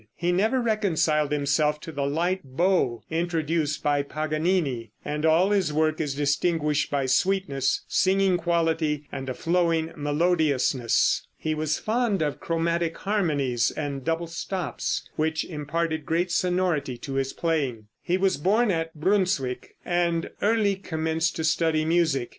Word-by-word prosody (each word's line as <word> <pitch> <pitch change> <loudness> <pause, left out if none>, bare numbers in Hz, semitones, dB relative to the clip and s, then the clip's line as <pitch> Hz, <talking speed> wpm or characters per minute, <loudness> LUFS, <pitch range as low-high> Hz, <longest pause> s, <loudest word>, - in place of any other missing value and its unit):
He 175 +1 0
never 220 +8 +2
reconciled 175 - +1
himself 150 +1 +1
to 160 - -7
the 140 -2 -2
light 175 +6 0
bow 135 - +1
introduced 160 -2 -1
by 145 -1 +2
Paganini, 155 - -1
and 150 +1 -1
all 170 +5 +4
his 190 -6 +2
work 155 +1 +1
is 145 -3 -2
distinguished 150 +1 +1
by 140 -2 0
sweetness, 140 -2 +1
singing 190 -1 +2
quality 165 -3 0
and 135 -1 -5
a 130 - -3
flowing 165 0 +1
melodiousness. 145 -5 +1
He 155 - -2
was 155 0 -1
fond 220 -5 0
of 145 -2 -2
chromatic 165 0 -1
harmonies 145 - 0
and 140 -3 -4
double 165 +2 -1
stops, 165 -3 -3
which 160 0 0
imparted 160 0 -2
great 175 +2 0
sonority 175 -8 0
to 135 +2 -7
his 135 0 -1
playing. 140 -10 -1 0.2
He 180 +1 0
was 190 -2 +1
born 205 +8 +2
at 165 -1 -2
Brunswick, 165 -7 0
and 170 -1 0
early 205 -2 +2
commenced 160 -2 -1
to 160 - -3
study 155 0 +1
music. 160 -7 +1
160 Hz, 140 wpm, -25 LUFS, 145-175 Hz, 0.2 s, all